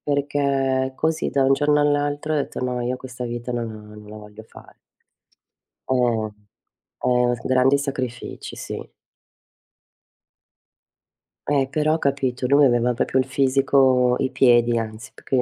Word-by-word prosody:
Perché 140 -2 0
così, 160 +2 -1
da 140 - +1
un 135 +1 +4
giorno 150 +1 +2
all'altro, 145 +1 0
ho - - +1
detto: 145 - -3
“No, 125 -1 -2
io 125 +1 -2
questa 125 -1 -8
vita 120 +1 -5
non 120 -1 -3
la 110 - -10 0.2
non 105 0 -13
la 105 - -10
voglio 105 0 -12
fare.” 110 - -17 1.1
Eh. 120 -4 +1 0.8
Eh, 125 -1 +2
grandi 130 +2 +3
sacrifici, 130 -4 -5
sì. - - -6 2.7
E 140 -2 +2
però, 155 +2 +1
capito; 135 -4 -1
lui 140 +2 +5
aveva 120 -1 +2
proprio 125 +2 -1
il 130 - +2
fisico, 130 -1 +3
i 130 - 0
piedi 120 -3 +3
anzi, 110 0 -6
più - - -18
che 130 -2 +1
130 Hz, 140 wpm, -22 LUFS, 120-140 Hz, 2.7 s, lui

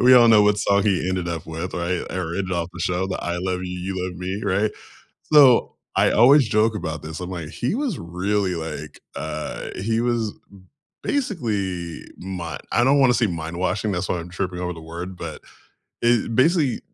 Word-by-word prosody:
We 125 +1 +7
all 120 -2 +8
know 110 -2 +7
what 105 0 +3
song 100 0 +3
he 95 -3 +1
ended 90 -2 -1
up 85 -2 -4
with, 80 +3 -5
right? 90 0 -1
I - - -4
read 90 +1 -2
it 95 - -4
off 85 -1 -1
the - - -7
show, 90 +1 0
the, 95 - -3
"I 85 0 -2
love 90 0 -2
you, 90 0 -5
you 95 0 -3
love 90 - -6
me," 95 +3 -4
right? 100 +2 +1 0.6
So, 135 -5 +6 0.2
I - - +4
always 130 +2 +6
joke 110 +1 +3
about 85 -6 -4
this, 80 +2 -7
I'm 90 - -5
like, 85 -4 -5
"He 125 - -2
was 255 - -1
really 95 +3 -1
like 75 -2 -6 0.2
uh, 75 0 -4
he 110 +4 0
was 120 -3 0 0.7
b - - -1
basically 105 - -2
mi" 90 -3 -5
I 120 - +3
don't 140 +3 +4
wanna 130 -2 +5
say 120 -2 +2
mind 85 -1 -4
washing, 100 +3 0
that's 95 0 -2
why 90 - 0
I'm 85 +1 -8
tripping 90 -1 -3
over 90 0 -2
the 80 - -10
word 85 +3 -7
but 80 -3 -7 0.6
i 120 -1 +4
basically 145 0 +3
95 Hz, 205 wpm, -23 LUFS, 85-115 Hz, 0.7 s, all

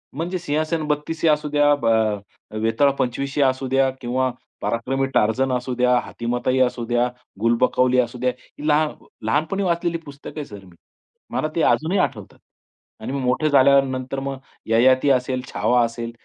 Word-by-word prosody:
म्हणजे 175 +5 -2
सिंहासन 155 -1 -1
बत्तीसी 150 +2 -1
असूद्या, 150 -1 +3
ब 140 -5 -6
अ, 110 -1 -1
वेताळ 115 +6 +3
पंचवीसी 135 +3 -1
असूद्या 135 0 +2
किंवा 130 +1 0 0.3
पराक्रमी 130 +4 -1
टार्जन 130 +5 +2
असू 125 0 -2
द्या, 125 0 +3
हातीमाताई 125 +2 -2
असू 120 -1 -5
द्या, 120 +1 +1 0.3
गुलबकवली 125 +2 +3
असू 120 0 -1
द्या, 125 0 +1 0.3
ही 150 - -4
लहा 155 0 +3 0.4
लहानपणी 155 - 0
वाचलेली 170 -1 0
पुस्तक 140 +2 -10
आहे 150 - -4
सर 100 -2 -11
मी. 90 -2 -18 0.6
मला 155 - -1
ते 165 - +1
अजूनही 175 +5 +2
आठवतात. 105 - -3 0.6
आणि - - -5
मी 140 - -2
मोठे 130 +4 +1
झाल्यानंतर 135 -1 +3
मग 135 0 -4 0.3
ययाती 130 +4 +4
असेल, 130 0 0
छावा 125 0 +2
असेल 115 0 -5
130 Hz, 150 wpm, -22 LUFS, 120-145 Hz, 0.6 s, ययाती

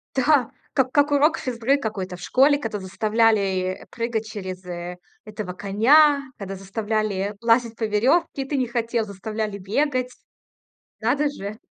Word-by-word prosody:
Да, 265 -2 +3 0.2
как 260 -2 +1
как 290 0 +3
урок 290 +3 +4
физ-ры 255 +2 0
какой-то 195 -7 -4
в 180 - -13
школе, 280 +8 +4
когда 220 -5 -4
заставляли 195 -2 +1
прыгать 230 -2 -2
через 185 -3 -7
э 175 0 -6 0.3
этого 210 -4 -6
коня, 280 +10 +4
когда 195 -1 -6
заставляли 205 0 -2
лазить 230 0 +2
по 225 - -5
веревке, 270 +9 +1
и - - -3
ты 285 0 -1
не 255 -2 0
хотел, 235 -1 -1
заставляли 210 +1 -4
бегать. 255 +5 0 0.9
Надо 275 +6 +1
же 210 -5 -7
225 Hz, 145 wpm, -23 LUFS, 200-260 Hz, 0.9 s, урок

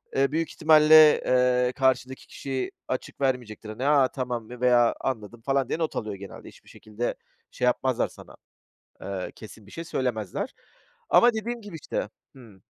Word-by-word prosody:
eee, 135 +1 +2
büyük 165 +1 -1
ihtimalle, 155 -1 +6
eee, 125 0 +2
karşıdaki 130 -1 0
kişi 135 -2 -4 0.2
açık 130 +2 -5
vermeyecektir. 120 -5 -2
"A, 140 -1 +4
tamam," 125 -3 -4
mı 125 +1 -11
veya, 120 -1 +4
"Anladım," 115 -2 -4
falan 135 +1 0
diye 165 - -2
not 160 - -2
alıyor 105 -2 -3
genelde. 95 -1 -11
Hiçbir - - -16
şekilde 110 +3 -5 0.4
şey 125 - -2
yapmazlar 125 0 +1
sana. - - -15 0.7
Eee, 95 -2 -5
kesin 110 -1 -13
bir - - -15
şey 165 - -6
söylemezler. 125 - -3 0.6
Ama 240 0 +6
dediğim 230 +2 -4
gibi 205 -5 -10
işte - - -3 0.3
Hımm. 110 -7 -16
130 Hz, 155 wpm, -26 LUFS, 115-145 Hz, 0.7 s, ihtimalle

